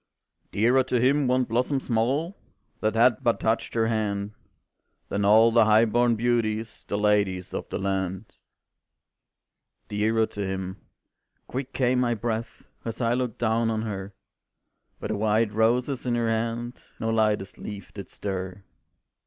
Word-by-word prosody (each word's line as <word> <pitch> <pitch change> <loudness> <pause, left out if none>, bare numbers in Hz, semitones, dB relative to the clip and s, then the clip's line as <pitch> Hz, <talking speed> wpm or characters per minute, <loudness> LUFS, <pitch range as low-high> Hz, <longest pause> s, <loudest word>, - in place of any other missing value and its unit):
"Dearer 120 +5 +3
to 125 -2 0
him 135 +3 +3
one 130 +1 +3
blossom 125 +4 0
small 135 - 0 0.4
That 110 +1 0
had 120 0 +4
but 115 - +2
touched 110 +1 -1
her 115 -1 +2
hand, 105 -2 -1 0.8
Than 100 - -1
all 110 +3 +6
the 115 -1 +5
high 110 +1 +5
born 120 +1 +2
beauties 115 -1 -1
The 100 - -1
ladies 100 -3 +1
of - - -5
the - - -3
land. 95 +1 -3 1.5
"Dearer 110 +2 +2
to 105 - -7
him," 95 0 -4 0.7
quick 130 +1 -5
came 125 -1 +1
my 120 -2 +1
breath 115 +1 -4 0.2
As 115 - -5
I 115 -1 +1
looked 125 -3 -2
down 115 0 +1
on 110 -1 -1
her, 100 -2 -5 0.8
But - - -5
the 110 - -1
white 110 +1 +1
roses 125 +4 +1
in 120 - +1
her 115 -1 0
hand 115 +2 -2 0.2
No 115 - -1
lightest 105 -3 0
leaf 100 -1 -8
did 100 -2 -8
stir. 95 -1 -5
110 Hz, 150 wpm, -26 LUFS, 105-120 Hz, 1.5 s, all